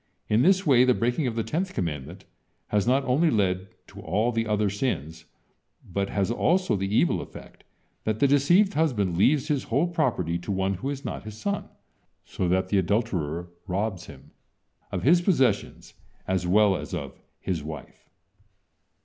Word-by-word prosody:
In 110 Hz, +2 st, +3 dB
this 190 Hz, +5 st, +4 dB
way, 130 Hz, -5 st, +6 dB
the 125 Hz, -1 st, +4 dB
breaking 125 Hz, +5 st, 0 dB
of 115 Hz, -, -3 dB
the 115 Hz, -, -1 dB
tenth 175 Hz, -, -3 dB
commandment 85 Hz, +2 st, -4 dB, 0.4 s
has 105 Hz, 0 st, +1 dB
not 135 Hz, +2 st, +3 dB
only 150 Hz, +7 st, +3 dB
led 95 Hz, -5 st, 0 dB, 0.2 s
to -, -, -11 dB
all 110 Hz, +4 st, 0 dB
the 115 Hz, -1 st, -1 dB
other 105 Hz, -1 st, +1 dB
sins, 95 Hz, -, -3 dB, 0.6 s
but 100 Hz, +2 st, -2 dB
has 100 Hz, +1 st, 0 dB
also 180 Hz, -, +1 dB
the 95 Hz, 0 st, -2 dB
evil 110 Hz, -, +2 dB
effect -, -, -12 dB, 0.4 s
that 110 Hz, 0 st, -1 dB
the 140 Hz, -, +4 dB
deceived 175 Hz, +9 st, +4 dB
husband 110 Hz, -, +1 dB
leaves 140 Hz, -, +3 dB
his 145 Hz, -4 st, -1 dB
whole 135 Hz, +8 st, +1 dB
property 120 Hz, -, -1 dB
to 85 Hz, -, -5 dB
one 95 Hz, 0 st, 0 dB
who 100 Hz, +9 st, -4 dB
is 140 Hz, -1 st, -5 dB
not -, -, -4 dB
his 110 Hz, -1 st, -9 dB
son, 200 Hz, -, -3 dB, 0.6 s
so 90 Hz, -, -3 dB
that 95 Hz, +1 st, +1 dB
the 100 Hz, -, +3 dB
adulterer 90 Hz, -5 st, -1 dB, 0.2 s
robs 95 Hz, 0 st, -2 dB
him 70 Hz, -3 st, -14 dB, 0.6 s
of -, -, -3 dB
his 170 Hz, +6 st, +5 dB
possessions 135 Hz, -, 0 dB, 0.3 s
as 95 Hz, -1 st, 0 dB
well 100 Hz, +1 st, +4 dB
as 90 Hz, -, -5 dB
of 70 Hz, -6 st, -7 dB, 0.2 s
his 85 Hz, -5 st, -3 dB
wife. 75 Hz, -1 st, -10 dB
105 Hz, 170 wpm, -26 LUFS, 95-135 Hz, 0.6 s, way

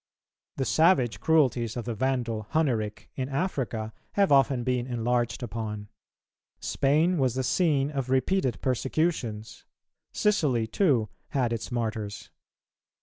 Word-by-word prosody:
The 135 Hz, -, 0 dB
savage 125 Hz, -, +3 dB
cruelties 130 Hz, -8 st, +2 dB
of 120 Hz, -, -4 dB
the 120 Hz, -, -2 dB
Vandal 115 Hz, -3 st, -1 dB
Hunneric 115 Hz, -10 st, 0 dB
in 130 Hz, 0 st, -3 dB
Africa 135 Hz, -, -2 dB, 0.2 s
have 200 Hz, -4 st, +2 dB
often 135 Hz, -2 st, +4 dB
been 125 Hz, 0 st, -1 dB
enlarged 120 Hz, 0 st, -1 dB
upon; 105 Hz, -3 st, -5 dB, 0.7 s
Spain 155 Hz, +5 st, +2 dB
was 130 Hz, -3 st, +1 dB
the 130 Hz, -, 0 dB
scene 145 Hz, 0 st, +2 dB
of 135 Hz, -3 st, -3 dB
repeated 130 Hz, +2 st, +1 dB
persecutions; 130 Hz, -4 st, -1 dB, 0.5 s
Sicily, 150 Hz, -, +1 dB
too, 120 Hz, -, +1 dB, 0.2 s
had 125 Hz, -4 st, 0 dB
its 115 Hz, +2 st, -5 dB
Martyrs. 110 Hz, -3 st, -3 dB
125 Hz, 120 wpm, -27 LUFS, 115-140 Hz, 0.7 s, often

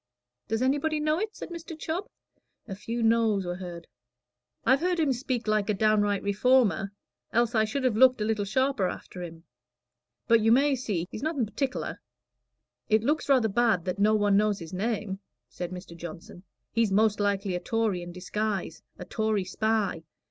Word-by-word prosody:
"Does 225 Hz, +3 st, 0 dB
anybody 290 Hz, +4 st, +1 dB
know 305 Hz, +2 st, +1 dB
it?" 430 Hz, +1 st, -3 dB
said -, -, -7 dB
Mr. 335 Hz, -1 st, -8 dB
Chubb. 335 Hz, +6 st, -3 dB, 0.6 s
A 200 Hz, -, -5 dB
few 230 Hz, +4 st, -4 dB
noes 225 Hz, -4 st, +3 dB
were 175 Hz, 0 st, -3 dB
heard. 175 Hz, -2 st, -8 dB, 0.8 s
"I've 265 Hz, +1 st, +5 dB
heard 355 Hz, +1 st, 0 dB
him 295 Hz, -4 st, +2 dB
speak 250 Hz, -2 st, -3 dB
like 215 Hz, -1 st, +1 dB
a 210 Hz, -, +2 dB
downright 205 Hz, -1 st, +2 dB
Reformer, 200 Hz, -2 st, +2 dB, 0.4 s
else 235 Hz, +1 st, +2 dB
I 220 Hz, -1 st, +3 dB
should 260 Hz, +5 st, -3 dB
have 250 Hz, -4 st, +2 dB
looked 255 Hz, +1 st, +6 dB
a 210 Hz, -, 0 dB
little 215 Hz, -1 st, 0 dB
sharper 245 Hz, 0 st, +1 dB
after 180 Hz, 0 st, -7 dB
him. 165 Hz, -1 st, -8 dB, 0.8 s
But 230 Hz, -1 st, +5 dB
you 225 Hz, +1 st, +4 dB
may 275 Hz, +4 st, +4 dB
see 205 Hz, -9 st, -2 dB
he's 215 Hz, -, -6 dB
nothing 295 Hz, -6 st, 0 dB
partic'lar." 255 Hz, +5 st, -3 dB, 0.9 s
"It 215 Hz, 0 st, +3 dB
looks 295 Hz, +3 st, 0 dB
rather 255 Hz, -5 st, +4 dB
bad 220 Hz, -4 st, +2 dB
that 185 Hz, +1 st, -3 dB
no 215 Hz, +2 st, +4 dB
one 205 Hz, -1 st, +3 dB
knows 210 Hz, 0 st, +3 dB
his 165 Hz, -1 st, -9 dB
name," 205 Hz, -1 st, -2 dB, 0.3 s
said 175 Hz, -1 st, -5 dB
Mr. 180 Hz, -1 st, -9 dB
Johnson. 170 Hz, +2 st, -10 dB, 0.3 s
"He's 230 Hz, -3 st, +1 dB
most 210 Hz, +1 st, +3 dB
likely 200 Hz, -1 st, 0 dB
a 180 Hz, -, -1 dB
Tory 215 Hz, -1 st, -1 dB
in 175 Hz, 0 st, -7 dB
disguise 190 Hz, -1 st, -3 dB, 0.2 s
a 180 Hz, -, -8 dB
Tory 215 Hz, -2 st, 0 dB
spy. 210 Hz, -2 st, 0 dB
215 Hz, 175 wpm, -27 LUFS, 195-250 Hz, 0.9 s, looked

